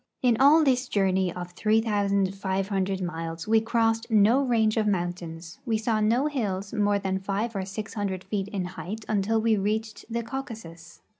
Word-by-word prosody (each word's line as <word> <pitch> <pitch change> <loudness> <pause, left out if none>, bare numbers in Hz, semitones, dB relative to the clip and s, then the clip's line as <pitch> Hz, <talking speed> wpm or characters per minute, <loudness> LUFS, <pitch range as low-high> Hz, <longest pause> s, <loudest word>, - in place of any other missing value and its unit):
In 245 -2 +4
all 295 +4 +7
this 260 -2 +2
journey 190 -3 +1
of 175 0 -7
3,500 195 -2 0
miles 165 -1 -5
we 220 0 +4
crossed 225 0 +1
no 220 +4 +5
range 225 -5 +2
of 220 -2 +1
mountains, 175 -3 -3
we 230 -4 0
saw 220 0 0
no 230 +6 +2
hills 205 -9 -2
more 205 -2 +2
than 190 -1 -2
five 205 +4 -2
or 190 -1 -2
six 205 +2 -6
hundred 195 -3 -3
feet 195 0 -3
in 195 -3 -3
height 205 +4 -7
until 215 +1 +1
we 220 -1 +2
reached 215 +2 -2
the 235 0 -2
Cau 265 +4 -3
casus. 170 -9 -11
205 Hz, 170 wpm, -26 LUFS, 190-225 Hz, -, all